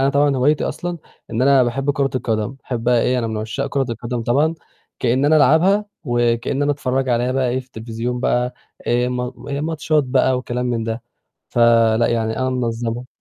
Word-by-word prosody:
أنا 135 - +3
طبعًا 140 -1 +2
هوايتي 145 +4 +2
أصلًا 175 -1 -4 0.3
إن 115 +2 -1
أنا 135 -1 +5
باحب 135 +4 0
كورة 140 -1 0
القدم، 110 -2 -1
باحبّها 125 -3 0
إيه 125 +2 +1
أنا 115 - -1
من 110 - -3
عُشّاق 110 +6 -3
كورة 135 -2 -1
القدم 120 0 -4
طبعًا، 145 +8 +2 0.4
كإن 130 +3 +1
أنا 155 +2 +5
ألعبها 170 +8 +4 0.2
وكإن 120 +1 0
أنا 145 0 +2
أتفرّج 130 -1 -1
عليها 120 +1 +1
بقى 130 -1 +1
إيه، 130 +2 0
في 125 - -15
التليفزيون 120 0 -4
بقى 125 0 0 0.3
آآ 120 +1 +2
ما 125 0 -3 0.3
ماتشات 155 -1 0
بقى 130 0 +2
وكلام 125 0 -3
من 120 -2 -1
ده. 115 +1 -4 0.5
فلأ، 115 -1 +4
يعني 110 -1 -1
أنا 130 0 0
منظّمها. 120 -1 -2
125 Hz, 180 wpm, -20 LUFS, 120-135 Hz, 0.5 s, أنا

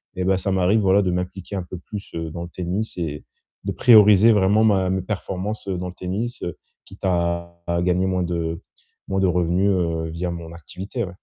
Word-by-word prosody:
Et 90 - -2
bah, 95 0 +3
ça 95 +1 -2
m'arrive, 95 +4 +3
voilà, 100 +1 +4
de 90 - 0
m'impliquer 90 +2 -4
un 95 - -2
peu 90 +1 -8
plus, 100 +2 -8
heu, 80 -1 -3
dans 85 +1 -5
le 85 - -8
tennis 90 +5 -3
et 75 -4 -4 0.4
de - - -1
prioriser 110 -2 +7
vraiment 105 +2 +4
ma 95 -3 +3
mes 95 0 0
performances, 100 +1 -4
heu, 95 -2 -1
dans 90 - -4
le 90 - -7
tennis, 105 +8 -4
heu, 85 - -4 0.3
quitte 95 +1 -15
à 85 -1 -1
à 85 0 0
gagner 90 +1 +2
moins 90 -1 0
de 85 -1 -2 0.5
moins 95 - 0
de 95 - +4
revenus, 90 +2 +2
heu, 85 -3 0
via 85 +2 -3
mon 85 -1 -7
activité, 95 - -6
ouais. 90 - -9
90 Hz, 215 wpm, -22 LUFS, 85-100 Hz, 0.5 s, prioriser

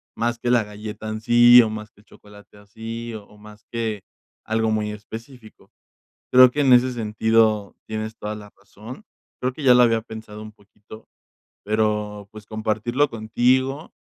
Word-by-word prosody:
más 120 +1 -1
que 120 0 -1
la 120 -2 +3
galleta 105 +1 -8
en 110 0 -5
sí 120 +1 +7
o 110 - -2
más 110 0 -7
que 105 - -24
el - - -31
chocolate 105 0 -18
así 115 +3 -8
o 105 -2 -10
o 105 - -20
más 105 0 -16
que 110 -4 -3 0.4
algo 110 0 0
muy 105 -1 -1
específico. 110 +2 -12 0.6
Creo 130 0 +8
que 145 - -2
en 130 -2 +4
ese 125 +1 +5
sentido 110 -2 +1
tienes 110 0 -5
toda 105 +1 -5
la 105 -1 -12
razón, 105 - -12 0.4
creo 130 +1 -1
que 150 - -9
ya 125 -2 +7
lo 125 - +6
había 115 -1 +1
pensado 110 -1 -10
un 110 - -9
poquito, 105 +1 -16 0.6
pero, 105 -1 -1
pues, 110 -1 -12
compartirlo 110 +6 -1
contigo 130 +6 0
110 Hz, 170 wpm, -22 LUFS, 105-120 Hz, 0.6 s, Creo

